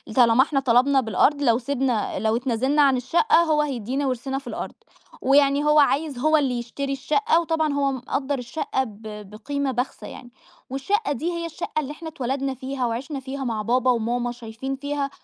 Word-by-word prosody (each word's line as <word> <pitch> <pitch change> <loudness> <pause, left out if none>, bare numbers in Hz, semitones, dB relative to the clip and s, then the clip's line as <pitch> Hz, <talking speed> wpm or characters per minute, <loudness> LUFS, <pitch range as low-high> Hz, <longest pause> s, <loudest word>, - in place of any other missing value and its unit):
طالما 240 0 +6
إحنا 285 -2 0
طلبنا 265 +2 +3
بالأرض 260 +6 +2
لو 235 -4 +4
سبنا 255 -3 -1
لو 220 0 +1
اتنازلنا 260 +4 +1
عن 270 -2 +4
الشقة 340 - +3
هو 305 -2 +2
هيدينا 270 0 -2
ورثنا 265 +1 -2
في 275 - -15
الأرض، - - -5 0.5
ويعني 280 +1 +4
هو 300 0 +5
عايز 290 -1 +2
هو 310 +4 +4
اللي 265 -4 0
يشتري 275 +4 -4
الشقة 340 - +2
وطبعًا 315 -3 0
هو 280 -1 +1
مقدر 265 +2 -2
الشقة 265 +2 -2
ب 215 -4 -11 0.3
بقيمة 280 +6 -3
بخسة 250 +1 -3
يعني، 245 -1 -11 0.4
والشقة 285 - -1
دي 320 +6 -2
هي 340 0 -3
الشقة 335 -1 -4
اللي 290 -1 -4
إحنا 320 +2 -7
اتولدنا 270 -2 -2
فيها 260 0 -3
وعشنا 265 +5 -3
فيها 270 +1 -6
مع 225 -4 -2
بابا 250 +3 +2
وماما 240 +1 -1
شايفين 240 +3 -6
فيها 285 0 -3
270 Hz, 175 wpm, -24 LUFS, 245-290 Hz, 0.5 s, طالما